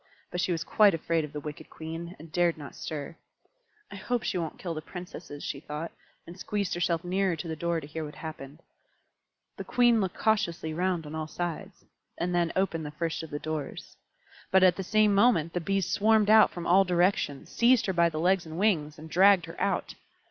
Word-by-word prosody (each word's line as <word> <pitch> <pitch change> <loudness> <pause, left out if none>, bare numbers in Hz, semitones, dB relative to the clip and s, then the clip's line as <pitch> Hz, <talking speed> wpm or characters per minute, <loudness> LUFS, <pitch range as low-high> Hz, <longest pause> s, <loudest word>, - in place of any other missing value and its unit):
But 180 - -2
she 180 - 0
was 165 -2 -1
quite 205 +1 +4
afraid 165 0 0
of 150 - -7
the 150 - -5
wicked 150 0 -8
Queen, 165 +2 -7
and 160 +1 -13
dared 175 0 +2
not 145 -3 -9
stir. 155 +1 -6 0.8
"I - - -7
hope 240 +4 -2
she - - -2
won't 165 -2 -4
kill 175 -3 -4
the 155 - -5
Princesses," 175 -4 -9
she 140 - -4
thought, 150 +3 -6 0.3
and 175 +2 -11
squeezed 205 -1 -2
herself 170 -1 0
nearer 185 0 0
to 165 +2 -6
the 160 - -3
door 170 +1 -1
to 150 - -9
hear 155 +2 -5
what 150 -1 -8
happened. 155 -1 -9 0.9
The - - -5
Queen 240 -2 +3
looked 190 -2 -3
cautiously 190 -8 0
round 175 -1 -1
on 150 - -8
all 155 -1 -3
sides, 175 +1 -5 0.3
and 175 +1 -1
then 175 -1 +1
opened 180 -4 0
the - - -5
first 165 +2 -3
of 160 - -8
the 145 - -4
doors. 155 -2 -5 0.5
But 190 0 +5
at 185 -1 +6
the - - -4
same 215 +2 +3
moment 195 -7 +3
the 175 - -1
Bees 195 +2 0
swarmed 215 0 +3
out 220 0 +7
from 175 -1 -7
all 190 +3 +5
directions, 175 -5 0
seized 240 0 +4
her 190 - -1
by 170 -1 +4
the 155 -1 -4
legs 180 0 +2
and 160 +1 -7
wings, 165 -7 +1
and 155 +1 -10
dragged 185 +1 +5
her - - -9
out. - - -1
170 Hz, 215 wpm, -28 LUFS, 160-190 Hz, 0.9 s, out